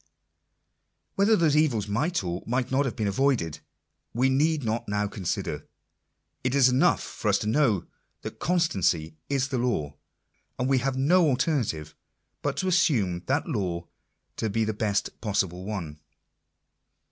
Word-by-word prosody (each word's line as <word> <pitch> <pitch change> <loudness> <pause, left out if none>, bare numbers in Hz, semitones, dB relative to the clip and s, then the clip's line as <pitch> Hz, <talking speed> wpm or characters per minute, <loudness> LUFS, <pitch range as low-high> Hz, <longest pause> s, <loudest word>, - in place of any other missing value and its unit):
Whether 205 +3 +4
those 160 -6 +3
evils 130 -10 +2
might 135 - 0
or 90 0 -3
might 125 +2 -1
not 140 +2 +2
have 130 - -3
been 110 - -2
avoided, 100 - +1 0.6
we 130 +3 +3
need 150 +2 +2
not 115 +1 -2
now 105 0 0
consider. 100 -3 -4 0.8
It 125 +1 0
is 130 -2 +6
enough 125 +1 +3
for - - -6
us - - +4
to - - -4
know 115 - +2 0.4
that - - -7
con 180 +5 +1
stancy 85 - 0
is 135 -1 0
the 130 -3 -1
law, 80 - -1 0.6
and 125 0 0
we 135 -1 +3
have 130 +1 -1
no 165 +6 +4
alternative 125 - -1 0.5
but - - -2
to 190 - -1
assume 115 - +2
that 140 +4 0
law 90 -6 -2 0.5
to 110 - -1
be 110 +2 0
the 110 - -1
best 105 -2 -2
possible 95 -4 -1
one. 85 -8 -5
120 Hz, 155 wpm, -26 LUFS, 100-140 Hz, 0.8 s, is